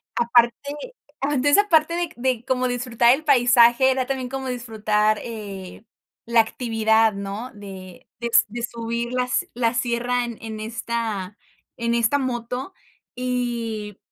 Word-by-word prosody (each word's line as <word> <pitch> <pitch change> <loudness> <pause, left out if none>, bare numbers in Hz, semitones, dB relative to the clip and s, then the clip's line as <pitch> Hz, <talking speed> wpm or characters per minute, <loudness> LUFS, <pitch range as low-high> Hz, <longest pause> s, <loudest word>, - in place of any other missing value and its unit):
aparte 235 0 +4 0.7
Ah, 285 +2 0
entonces 285 +4 +3
aparte 335 -4 +2
de 350 - 0
c 340 - -4
de 245 -1 -1
como 255 -1 0
disfrutar 245 -1 +3
el 310 +3 -3
paisaje, 245 -1 +5
era 260 -1 0
también 260 -2 -3
como 265 0 -4
disfrutar, 215 -3 0
eh, 200 -5 -8 0.4
la 235 0 +3
actividad, 225 -1 +2
¿no?, 200 +5 -5
de 190 -3 -11
de 235 - -1
s 235 - +5
de 235 +3 -6
subir 235 0 -3
las 250 0 0
la 235 -1 +1
sierra 245 0 0
en 225 -2 -6
esta 225 -3 -4 0.4
en 235 -1 -1
esta 235 +4 +2
moto 250 +4 -3 0.4
y 235 -4 -3
235 Hz, 140 wpm, -23 LUFS, 220-250 Hz, 0.7 s, paisaje